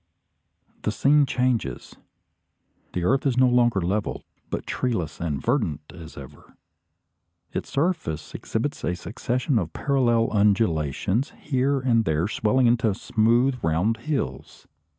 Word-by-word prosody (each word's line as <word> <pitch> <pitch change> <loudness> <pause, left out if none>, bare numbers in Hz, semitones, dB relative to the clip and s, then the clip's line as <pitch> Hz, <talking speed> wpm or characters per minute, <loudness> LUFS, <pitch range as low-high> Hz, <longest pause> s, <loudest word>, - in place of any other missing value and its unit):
The 105 - -1
scene 140 +6 +3
changes. 125 - -1 1.0
The 90 - -2
earth 135 +9 +2
is 125 -2 0
no 130 0 +6
longer 120 -4 +3
level, 100 +5 -2 0.3
but - - -4
treeless 100 -11 -2
and 75 -5 -2
verdant 110 - 0
as 80 -3 -11
ever. 70 +1 -12 1.0
Its - - -4
surface 140 - -2
exhibits - - -3
a 85 +5 0
succession 125 - -1
of 85 -4 -4
parallel 120 -5 +2
undulations, 100 - +1
here 135 0 0
and 120 -3 +3
there 80 -1 0
swelling 110 +4 +1
into 115 -3 +2
smooth 120 +5 +2
round 85 +8 +1
hills. 115 - -4
115 Hz, 125 wpm, -24 LUFS, 85-130 Hz, 1.0 s, no